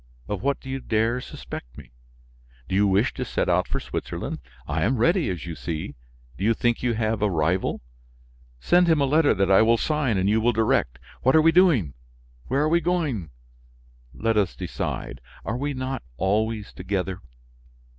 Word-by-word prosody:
Of 105 Hz, -3 st, -3 dB
what 140 Hz, +3 st, 0 dB
do -, -, -13 dB
you 135 Hz, 0 st, -3 dB
dare 115 Hz, +1 st, 0 dB
suspect -, -, -9 dB
me? 65 Hz, -5 st, -12 dB, 0.8 s
Do -, -, -5 dB
you 100 Hz, +2 st, +4 dB
wish 100 Hz, +4 st, +2 dB
to -, -, -3 dB
set -, -, -1 dB
out -, -, +2 dB
for -, -, -2 dB
Switzerland? -, -, -5 dB, 0.3 s
I 80 Hz, +2 st, -1 dB
am 125 Hz, +8 st, +1 dB
ready, 165 Hz, -, +2 dB
as 90 Hz, -5 st, -4 dB
you 85 Hz, -, -5 dB
see. 80 Hz, -2 st, -5 dB, 0.5 s
Do -, -, -3 dB
you 115 Hz, +2 st, +3 dB
think 120 Hz, +1 st, 0 dB
you 120 Hz, -2 st, 0 dB
have 110 Hz, -1 st, -1 dB
a 105 Hz, -, +3 dB
rival? 85 Hz, +1 st, 0 dB, 0.8 s
Send 175 Hz, -, +4 dB
him 160 Hz, -2 st, +4 dB
a 140 Hz, -, +3 dB
letter 150 Hz, 0 st, +3 dB
that 95 Hz, 0 st, +1 dB
I 95 Hz, -, +7 dB
will 115 Hz, +1 st, +4 dB
sign 145 Hz, -6 st, 0 dB
and 95 Hz, +1 st, +1 dB
you 110 Hz, +2 st, +3 dB
will 120 Hz, +2 st, +3 dB
direct. 110 Hz, -, +1 dB, 0.2 s
What 130 Hz, +3 st, +3 dB
are 160 Hz, -, +7 dB
we 165 Hz, -, +6 dB
doing? 160 Hz, -, +4 dB, 0.5 s
Where 140 Hz, +3 st, +1 dB
are 155 Hz, -, +2 dB
we 170 Hz, +1 st, +3 dB
going? 150 Hz, -, -1 dB, 0.8 s
Let 115 Hz, -1 st, 0 dB
us 100 Hz, -5 st, +1 dB
decide. -, -, -4 dB, 0.2 s
Are 110 Hz, -, -2 dB
we 145 Hz, +2 st, -2 dB
not 130 Hz, +1 st, -3 dB, 0.2 s
always 105 Hz, +2 st, 0 dB
together? 95 Hz, 0 st, -3 dB
110 Hz, 185 wpm, -24 LUFS, 95-135 Hz, 0.8 s, I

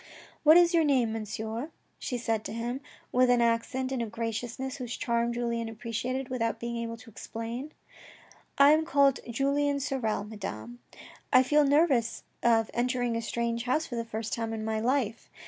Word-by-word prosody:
" -, -, -25 dB
What 310 Hz, +2 st, +8 dB
is 350 Hz, 0 st, +5 dB
your 330 Hz, -1 st, +5 dB
name, 255 Hz, -7 st, +2 dB
Monsieur? 220 Hz, +4 st, -4 dB, 0.2 s
" -, -, -42 dB
she 250 Hz, -, -3 dB
said 225 Hz, -2 st, -1 dB
to -, -, -5 dB
him, 240 Hz, +3 st, -3 dB, 0.3 s
with 255 Hz, 0 st, +4 dB
an 245 Hz, -1 st, +5 dB
accent 235 Hz, +3 st, 0 dB
and 260 Hz, -2 st, -1 dB
a 230 Hz, -, -2 dB
graciousness 235 Hz, +4 st, -4 dB
whose 250 Hz, -2 st, -5 dB
charm 235 Hz, 0 st, 0 dB
Julien 235 Hz, -1 st, -2 dB
appreciated 245 Hz, +4 st, -3 dB
without 230 Hz, -3 st, -1 dB
being 235 Hz, 0 st, -4 dB
able 230 Hz, 0 st, -4 dB
to 225 Hz, -, -14 dB
explain. 230 Hz, +7 st, -6 dB, 0.4 s
" -, -, -25 dB
I 280 Hz, +1 st, +8 dB
am 310 Hz, +1 st, +4 dB
called 280 Hz, -4 st, +3 dB
Julien 280 Hz, +3 st, +1 dB
Sorel, 250 Hz, -7 st, -1 dB
Madame. 120 Hz, -, -7 dB, 0.5 s
I 255 Hz, -, +7 dB
feel 295 Hz, +3 st, +4 dB
nervous 275 Hz, -5 st, +2 dB, 0.2 s
of 225 Hz, -2 st, +3 dB
entering 245 Hz, -1 st, 0 dB
a 230 Hz, -, -1 dB
strange 235 Hz, +1 st, -2 dB
house 305 Hz, +6 st, +1 dB
for 245 Hz, -, -6 dB
the 230 Hz, -, -1 dB
first 225 Hz, -1 st, -5 dB
time 225 Hz, -1 st, -2 dB
in 220 Hz, -1 st, -4 dB
my 220 Hz, 0 st, -1 dB
life. 240 Hz, -1 st, -1 dB
235 Hz, 185 wpm, -29 LUFS, 230-265 Hz, 0.5 s, What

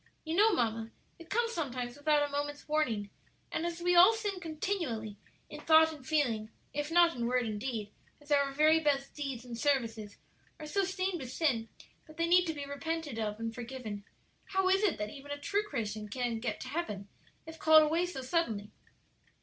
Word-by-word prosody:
You 320 Hz, +1 st, -2 dB
know, 430 Hz, +4 st, +6 dB
mamma, 225 Hz, -, 0 dB, 0.3 s
it 335 Hz, -1 st, -13 dB
comes 460 Hz, +1 st, +1 dB
sometimes 250 Hz, -, -3 dB
without 290 Hz, 0 st, +2 dB
a -, -, -12 dB
moment's 290 Hz, 0 st, -3 dB
warning; 235 Hz, -10 st, 0 dB, 0.4 s
and 335 Hz, -, -1 dB
as 345 Hz, 0 st, -5 dB
we 355 Hz, 0 st, +3 dB
all 365 Hz, +6 st, +9 dB
sin 415 Hz, -4 st, -3 dB
continually 310 Hz, -, -3 dB, 0.3 s
in -, -, -9 dB
thought 320 Hz, 0 st, +6 dB
and 295 Hz, -4 st, -12 dB
feeling, 250 Hz, -7 st, 0 dB, 0.2 s
if 295 Hz, +1 st, -2 dB
not 340 Hz, 0 st, +5 dB
in 235 Hz, -1 st, -1 dB
word 250 Hz, 0 st, +1 dB
and 215 Hz, -2 st, -3 dB
deed, 220 Hz, -5 st, -3 dB, 0.3 s
as 290 Hz, 0 st, -15 dB
our 280 Hz, -1 st, +3 dB
very 310 Hz, +3 st, +5 dB
best 280 Hz, -3 st, 0 dB
deeds 270 Hz, -5 st, -5 dB
and 240 Hz, -1 st, -6 dB
services 230 Hz, -5 st, -1 dB, 0.4 s
are 305 Hz, -, -7 dB
so 390 Hz, +6 st, 0 dB
stained 370 Hz, -1 st, -1 dB
with 255 Hz, -3 st, -7 dB
sin 255 Hz, -7 st, 0 dB, 0.4 s
that 310 Hz, 0 st, -15 dB
they 335 Hz, -, +2 dB
need 355 Hz, +1 st, +5 dB
to 320 Hz, -, -1 dB
be 285 Hz, -1 st, -5 dB
repented 290 Hz, -2 st, -4 dB
of 210 Hz, -1 st, -2 dB
and 225 Hz, 0 st, -3 dB
forgiven, 235 Hz, -4 st, -6 dB, 0.4 s
how 385 Hz, -1 st, +1 dB
is 385 Hz, +1 st, +4 dB
it 415 Hz, -5 st, +2 dB
that 210 Hz, 0 st, -4 dB
even 280 Hz, 0 st, -11 dB
a 290 Hz, -, -3 dB
true 400 Hz, +8 st, 0 dB
Christian 215 Hz, -5 st, -3 dB
can 240 Hz, 0 st, -2 dB
get 220 Hz, -2 st, -3 dB
to 255 Hz, -, -6 dB
heaven 235 Hz, -, -3 dB, 0.4 s
if 320 Hz, 0 st, -10 dB
called 315 Hz, 0 st, +7 dB
away 330 Hz, +4 st, +1 dB
so 310 Hz, -7 st, -5 dB
suddenly?" 230 Hz, -9 st, -1 dB
290 Hz, 200 wpm, -32 LUFS, 235-330 Hz, 0.4 s, all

